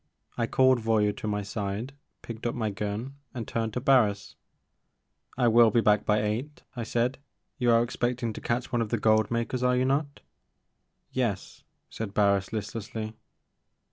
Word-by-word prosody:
I 115 -1 0
called 130 0 +4
Voyou 110 -2 +2
to - - -5
my 105 -1 -1
side, 100 +5 -4 0.3
picked 115 0 -5
up 120 - -2
my 110 -3 -1
gun 105 +7 -4 0.2
and 115 -3 -4
turned 115 -2 -2
to - - 0
Barris. 120 -7 +2 1.0
I 125 -2 +3
will 115 0 +6
be 115 - +3
back 105 -2 +3
by 105 0 +3
eight,*' 120 +8 -3
I 120 - -4
said; 120 +3 -1 0.2
*' - - -52
you 125 - +2
are 115 0 +5
expecting 120 -1 -2
to - - -8
catch 120 +2 -2
one 120 -2 +1
of 110 - -2
the 120 - 0
gold 110 0 +3
makers 115 +2 -1
are 125 0 +3
you 130 - +2
not?" 140 +2 -1 0.5
" - - -50
Yes," 120 -7 -2 0.3
said 105 -3 -5
Barris 100 -2 +2
listlessly. 110 0 -5
115 Hz, 175 wpm, -27 LUFS, 105-125 Hz, 1.0 s, will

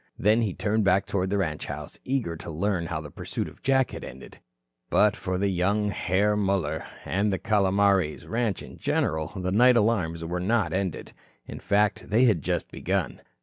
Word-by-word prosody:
Then 110 +3 +3
he 105 -6 -1
turned 110 +1 0
back 95 0 +3
toward 95 -1 -1
the 100 - 0
ranch 80 -6 -2
house, - - -7
eager 125 -11 -1
to 80 - -9
learn 85 +1 -1
how 80 -2 -3
the 75 -1 -10
pursuit - - -4
of - - -14
Jack 130 -1 +2
had - - -7
ended. 65 +2 -11 0.5
But 105 -1 +4
for 95 0 -3
young 100 +3 +1
Herr 100 +2 +1
Muller 95 -7 0 0.2
and 100 +2 0
the 95 - 0
Calomares 100 -5 +2
ranch 115 -2 -1
in - - -12
general 80 -1 0
the 90 -1 -2
night 120 +4 +5
alarms 90 -7 +1
were 90 +2 -2
not 105 +3 +1
ended. 95 -3 -3 0.3
In - - -8
fact, 105 +1 +1
they 110 +5 +4
had 105 -10 +3
just - - -2
begun. 90 -10 -2
100 Hz, 185 wpm, -26 LUFS, 85-105 Hz, 0.5 s, night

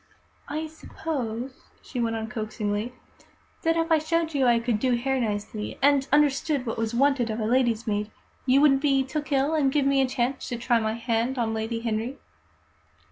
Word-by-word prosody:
"I 310 +2 -3
suppose," 265 -6 -5 0.2
she 255 - -6
went 230 -1 0
on 220 0 -3
coaxingly, 215 0 -3 0.7
"that 330 0 +2
if 330 0 0
I 320 - +6
showed 325 +1 0
you 270 -3 +2
I 240 -1 +5
could 230 -2 0
do 255 +1 +2
hair 265 +2 0
nicely, 210 -1 -3
and 280 -1 +3
understood 290 -1 +2
what 225 -1 -3
was 225 +1 -1
wanted 270 -2 +2
of 220 +1 -2
a 215 - -1
lady's 235 -1 +2
maid, 210 -1 -1 0.4
you 265 +2 +5
wouldn't 275 -2 +5
be 275 -2 +3
took 295 +3 -4
ill, 275 +3 +2
and 285 -4 +2
give 285 -1 +2
me 275 0 +3
a 265 - +2
chance 255 +1 -2
to 240 - -3
try 235 0 +2
my 220 -1 -1
hand 230 +2 -1
on 225 -2 0
Lady 225 +1 -2
Henry? 230 +3 -2
250 Hz, 190 wpm, -26 LUFS, 225-280 Hz, 0.7 s, I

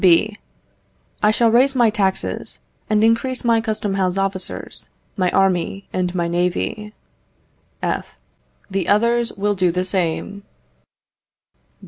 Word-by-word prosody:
B. 200 +4 +4 0.8
I 210 - +4
shall 225 +1 +3
raise 265 +4 +4
my 240 -3 +4
taxes, 195 -3 -1 0.3
and 215 0 +3
increase 230 +3 +1
my 230 -2 +3
custom 215 -3 -2
house 190 -1 0
officers, 195 -1 -3 0.3
my 185 -3 +1
army, 195 +1 +1
and 180 0 -1
my 170 -1 0
navy. 180 +5 -2 0.9
F. - - -2 0.5
The 195 -2 -2
others 235 +3 +2
will 205 +1 0
do 185 -2 +2
the 180 +2 -1
same. 185 +2 -2
200 Hz, 120 wpm, -20 LUFS, 185-225 Hz, 0.9 s, B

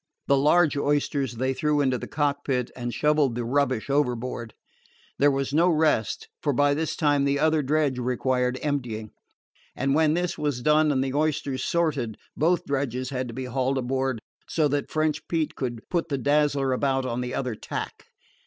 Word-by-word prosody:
The 140 - +4
large 150 +3 +4
oysters 145 -2 0
they 130 +3 0
threw 150 +2 +1
into 130 -3 +1
the - - -6
cockpit, 140 -4 -1
and 120 -1 -4
shoveled 150 -3 +2
the 120 -1 -2
rubbish 130 -2 0
overboard. 125 -4 -1 0.6
There 145 - +5
was 135 0 -1
no 170 +4 +4
rest, 155 -9 +1
for 145 - +1
by 145 +2 +3
this 155 +2 -2
time 145 -3 +2
the 140 0 +2
other 155 +1 +2
dredge 145 -2 +1
required 125 0 0
emptying. 120 -8 -3 0.6
And 135 +1 0
when 155 +1 +3
this 175 0 -2
was 145 -5 -1
done 150 +1 +4
and 135 -2 +1
the 135 -1 -3
oysters 145 -3 -1
sorted, 145 -10 0 0.2
both 170 +4 +1
dredges 130 -2 -2
had 130 -1 -2
to 115 - -8
be 130 0 -4
hauled 130 +1 -1
aboard, 130 -1 -1 0.3
so 155 -2 +2
that 145 0 -1
French 155 -1 -1
Pete 160 -3 -1
could 120 -4 -5
put 170 -2 -1
the 140 - 0
Dazzler 145 0 +2
about 135 0 0
on 125 -1 -2
the 125 0 -3
other 130 -3 -2
tack. 105 - -6
140 Hz, 180 wpm, -25 LUFS, 125-150 Hz, 0.6 s, There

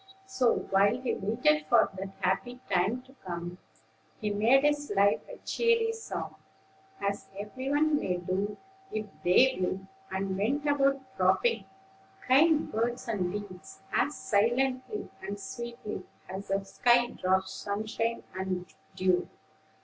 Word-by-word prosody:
So, 385 -12 +2 0.2
while 200 +5 +4
he 255 -1 -1
waited 190 -8 +1
for - - +5
that 195 +1 -5
happy 245 +7 0
time 200 +7 +2
to 265 +1 -19
come, 175 -1 -5 0.6
he 210 -1 -1
made 230 +7 +4
his 290 -2 +1
life 200 +1 +4
a - - -8
cheery 465 -1 +2
song, 450 0 -6 0.6
as 200 0 -2
every 255 +6 -5
one 295 +1 +3
may 180 -1 -1
do, 190 +4 -2 0.3
if 215 0 -2 0.2
they 245 +7 +5
will; 185 +1 -1 0.3
and 190 0 -2
went 265 +10 0
about 275 -2 +1
dropping 195 +3 +2 0.6
kind 300 +4 +4
words 235 +3 -1
and 190 -6 -1
deeds 195 -2 -8
as 295 - +2
silently 255 - 0
and 200 +1 -5
sweetly 235 +1 -6 0.3
as 190 +2 -6
the 195 0 0
sky 240 +5 +4
drops 190 0 0
sunshine 220 +3 -2
and 185 -1 -3 0.2
dew. 185 -1 +2
210 Hz, 135 wpm, -30 LUFS, 190-260 Hz, 0.6 s, for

